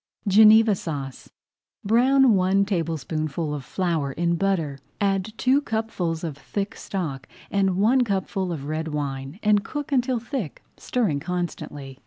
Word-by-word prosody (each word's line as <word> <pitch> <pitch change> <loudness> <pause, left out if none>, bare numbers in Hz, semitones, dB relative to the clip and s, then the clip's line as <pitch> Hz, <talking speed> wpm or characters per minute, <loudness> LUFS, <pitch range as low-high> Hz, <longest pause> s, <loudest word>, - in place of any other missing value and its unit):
GENEVA 215 +2 +7
SAUCE 140 - -6 0.6
Brown 255 +3 +5
one 195 +1 +3
tablespoonful 160 -4 -2
of 145 -2 -5
flour 160 -3 -1
in 170 +2 0
butter, 165 -7 -1 0.2
add 195 0 0
two 265 +3 +3
cupfuls 220 - -2
of 160 -4 -3
thick 195 +8 -4
stock 155 -9 -5 0.2
and 195 -2 +1
one 240 +6 +4
cupful 190 -3 -2
of 145 -5 -5
red 155 +2 -3
wine, 140 +1 -4
and 210 -1 +3
cook 295 +5 -5
until 255 -1 +2
thick, 230 - -5
stirring 205 - -1
constantly. 150 -5 -5
185 Hz, 135 wpm, -24 LUFS, 155-215 Hz, 0.6 s, GENEVA